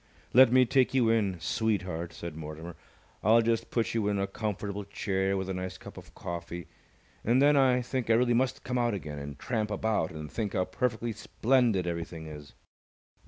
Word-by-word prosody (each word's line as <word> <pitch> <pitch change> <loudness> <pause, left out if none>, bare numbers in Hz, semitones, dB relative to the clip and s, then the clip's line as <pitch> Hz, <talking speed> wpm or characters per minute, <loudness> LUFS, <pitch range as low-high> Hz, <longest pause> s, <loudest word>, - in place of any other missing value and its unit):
"Let 130 -1 +8
me 130 0 +6
take 130 +1 +2
you 120 -4 +4
in, 100 -6 +1
sweetheart," 90 -2 -1
said 85 -1 -7
Mortimer. 80 +2 -7 0.5
"I'll 115 +2 +5
just 115 0 0
put 115 -2 0
you 110 -3 0
in 100 -1 +1
a 100 - +1
comfortable 100 0 -4
chair 95 -1 -1
with 95 -1 -3
a 95 - -2
nice 95 0 -4
cup - - -11
of - - -13
coffee, 85 0 -6 0.6
and 120 +4 +3
then 145 +1 +5
I 130 -2 +4
think 125 -1 -3
I - - +6
really 120 +1 +3
must 130 +2 0
come 125 0 -1
out 120 -3 +1
again 75 -6 -6
and 70 0 -7
tramp 110 -4 -2
about 105 -5 0
and 75 -2 -8
think 105 -4 -3
how 90 - +1
perfectly 115 +4 -1
splendid 115 -3 +1
everything 85 -1 -4
is." 75 -2 -10
105 Hz, 190 wpm, -29 LUFS, 85-120 Hz, 0.6 s, Let